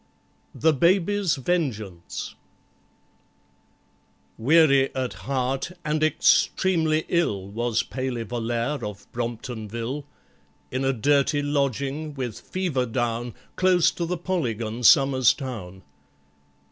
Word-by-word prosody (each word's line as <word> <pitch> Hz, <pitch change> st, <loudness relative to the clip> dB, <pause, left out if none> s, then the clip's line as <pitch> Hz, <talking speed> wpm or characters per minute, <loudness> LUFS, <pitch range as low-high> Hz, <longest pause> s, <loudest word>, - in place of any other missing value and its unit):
THE 160 Hz, 0 st, +3 dB
BABY'S 185 Hz, +3 st, +2 dB
VENGEANCE 120 Hz, -, -3 dB, 2.1 s
WEARY 140 Hz, +1 st, +4 dB
at 130 Hz, -2 st, -2 dB, 0.2 s
heart 135 Hz, +5 st, -1 dB
and 155 Hz, 0 st, 0 dB
extremely 155 Hz, +1 st, +2 dB
ill 105 Hz, -, 0 dB
Was 115 Hz, +2 st, -1 dB
PALEY 130 Hz, -1 st, -3 dB
VOLLAIRE 120 Hz, +4 st, -2 dB
of 105 Hz, -1 st, -6 dB
Bromptonville, 120 Hz, +2 st, -4 dB, 0.7 s
In 130 Hz, +1 st, -1 dB
a 135 Hz, -, +2 dB
dirty 140 Hz, +3 st, +2 dB
lodging, 140 Hz, +1 st, -1 dB
with 125 Hz, -5 st, -4 dB
fever 165 Hz, -10 st, -2 dB
down, 120 Hz, 0 st, -2 dB, 0.2 s
Close 180 Hz, -3 st, +4 dB
to 170 Hz, -1 st, -3 dB
the 180 Hz, +1 st, -2 dB
Polygon, 120 Hz, -, -2 dB
Somers 130 Hz, +1 st, +5 dB
Town. 100 Hz, -9 st, -7 dB
135 Hz, 95 wpm, -25 LUFS, 115-155 Hz, 2.1 s, Somers